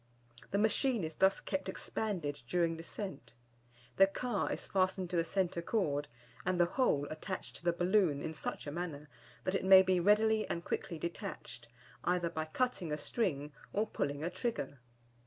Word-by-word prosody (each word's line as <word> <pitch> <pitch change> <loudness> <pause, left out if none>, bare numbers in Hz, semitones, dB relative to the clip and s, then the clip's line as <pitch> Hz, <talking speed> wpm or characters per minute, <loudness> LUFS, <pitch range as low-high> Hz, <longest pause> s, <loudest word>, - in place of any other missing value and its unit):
The 200 - 0
machine 220 +1 +2
is 160 0 -4
thus 190 0 +4
kept 190 -1 -3
expanded 165 -10 -3
during 170 0 +1
descent. 165 - -7 0.6
The 195 - +8
car 210 +1 -1
is - - -3
fastened 185 -1 0
to - - -1
the 165 - +3
centre 175 0 0
cord, 150 -7 0 0.4
and 180 0 0
the 175 - +6
whole 170 - +2
attached 185 +4 -5
to - - -13
the 175 - +3
balloon 175 -3 +3
in 160 - -3
such 155 - -5
a 145 - -4
manner 155 -3 -5 0.3
that 185 - 0
it 195 - 0
may 190 0 +9
be 185 -1 +3
readily 215 +3 +4
and 170 - -3
quickly 170 - -3
detached, 170 +2 -6 0.4
either 175 -1 +1
by 155 0 -2
cutting 185 -2 -1
a 150 - 0
string, 150 - -1 0.2
or 210 +2 +2
pulling 145 -6 -2
a 170 - -1
trigger. 185 - -3
180 Hz, 175 wpm, -34 LUFS, 160-195 Hz, 0.6 s, may